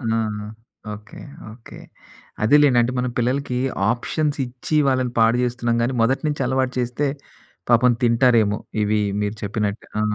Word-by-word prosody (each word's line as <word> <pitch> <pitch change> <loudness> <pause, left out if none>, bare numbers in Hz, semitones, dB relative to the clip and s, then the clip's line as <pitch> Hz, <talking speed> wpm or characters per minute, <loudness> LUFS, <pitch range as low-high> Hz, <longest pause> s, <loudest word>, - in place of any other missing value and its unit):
ఆ! - - +1 0.3
ఆ! - - -8 0.5
Okay 105 +1 -12 0.3
okay. 115 +1 -13 0.6
అదే 110 +7 +4
లేండి. 135 -4 +4
అంటే, 120 +2 0
మనం 125 -1 -1
పిల్లలకి 125 +1 -1 0.3
ఆప్షన్స్ 145 +5 -2
ఇచ్చి 125 +5 -4
వాళ్ళని 130 -2 +1
పాడు 115 +2 +4
జేస్తున్నాం 120 -1 -1
గాని, 120 +3 0
మొదటి 130 +6 +1
నుంచి 150 -2 -2
అలవాటు 130 0 0
చేస్తే 125 +4 -1 0.6
పాపం 120 +1 +5
తింటారేమో. 115 -3 +3 0.2
ఇవి 105 0 +1 0.2
మీరు 105 +1 -2
చెప్పినట్టు. 105 0 -3
ఆ! - - +1
120 Hz, 150 wpm, -21 LUFS, 115-130 Hz, 0.6 s, పాపం